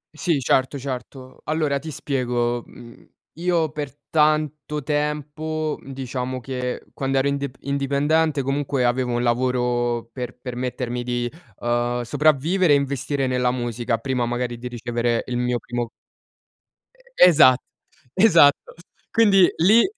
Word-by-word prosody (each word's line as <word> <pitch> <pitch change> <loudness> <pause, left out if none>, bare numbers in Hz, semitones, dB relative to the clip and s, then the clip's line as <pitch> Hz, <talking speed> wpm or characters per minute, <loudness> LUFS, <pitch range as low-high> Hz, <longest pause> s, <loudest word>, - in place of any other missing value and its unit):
Sì, 160 -2 0
certo, 130 +3 +1
certo. 130 0 -7
Allora 150 -2 0
ti 155 +3 -8
spiego. 120 -4 -1
Mhmm, 120 0 -14 0.3
io 170 -3 +1
per 145 -3 -5 0.2
tanto 150 -1 +1
tempo, 150 +2 -2
mhmm, 135 - -10
diciamo 130 -1 -4
che 125 0 -4
quando 135 0 -1
ero 135 +1 +2
ind 140 -1 -1
indipendente 140 +2 +1
comunque 135 -1 0
avevo 120 0 0
un 120 0 0
lavoro 120 -1 0
per 125 -1 -6
permettermi 125 -1 -4
di, 120 0 -2 0.3
uhm, 120 +1 0
sopravvivere 150 +6 +2
e - - +7
investire 140 0 -1
nella 125 -1 +1
musica, 120 -1 -2
prima 125 -2 -1
magari 120 0 -3
di 125 - -6
ricevere 120 0 -1
il 120 - -1
mio 125 0 0
primo 120 0 -4 1.3
Esa 150 -7 +7 0.6
esatto. 170 -8 +5 0.4
Quindi 195 -5 +5
lì 210 +8 +6
130 Hz, 125 wpm, -22 LUFS, 120-150 Hz, 1.3 s, e